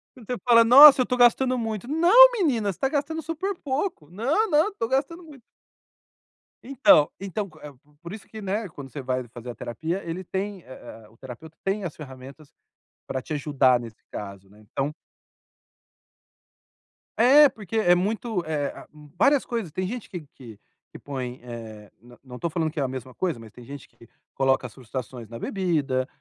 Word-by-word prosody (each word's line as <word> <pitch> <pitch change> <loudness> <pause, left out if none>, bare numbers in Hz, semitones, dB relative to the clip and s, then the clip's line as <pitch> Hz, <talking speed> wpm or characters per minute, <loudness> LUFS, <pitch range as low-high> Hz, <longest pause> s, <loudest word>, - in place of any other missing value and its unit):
Quando 245 -4 -15
você 250 - -3
fala: 230 -1 +7
"Nossa! 270 +3 +10
Eu - - +4
estou 250 0 -2
gastando 250 +1 +4
muito", 225 0 -4
"Não 365 - +7
menina 265 - 0
você - - -13
tá 270 - +1
gastando 315 +2 -2
super 335 +5 -4
pouco". 275 - -4
"Não, 275 - 0
não, 315 +6 +2
tô 230 - -3
gastando 300 +7 -2
muito". 295 -5 -14 1.2
Então, 230 - +4
então, 200 +1 -4
eh 150 - -9
o 135 - -19
q 150 +3 -30
por 170 +2 -8
isso 215 - -11
que, 220 - -10
né, 205 +2 -3
quando 140 -3 -10
você 140 +2 -7
vai 130 0 -2
fazer 120 +1 -10
a - - -12
terapia 160 - -4
ele 170 +3 -5
tem 190 0 -5
a 120 -3 -12
a - - -19
o 115 - -24
terapeuta 135 +6 -11
tem 195 +1 -1
as 170 - -5
ferramentas 135 +1 -12 0.6
pra 130 - -3
te 140 - -8
ajudar 140 -4 +2
nesse 115 -2 -11
caso. 100 -1 -8
né 105 +2 -20
então 135 +7 -4 2.3
É, 280 +5 +7
porque 220 -1 -6
é 175 -5 +4
muito, 205 +1 -2
eh 150 -3 -2
ah - - -12 0.3
várias 280 +7 +4
coisas. 230 -9 -4
Tem 185 +4 -3
gente 240 +2 -6
que 180 -3 -6
que 115 -5 -13 0.3
que - - -11
põe, 130 -3 -6
eh 110 -4 -10
não 120 +1 -17
não 130 -2 -11
estou 170 +7 -3
falando 160 -1 -1
que 155 - -6
é - - +1
a - - 0
mesma 130 -1 -7
coisa, 175 -10 -2
mas 115 -1 -13
tem 125 - -14
gente 140 +1 -10
que 115 - -20 0.3
coloca 135 -1 +1
as 110 - -17
frustrações 125 -1 -8
na 115 +1 -9
bebida, 150 - -1
170 Hz, 190 wpm, -25 LUFS, -, 2.3 s, Nossa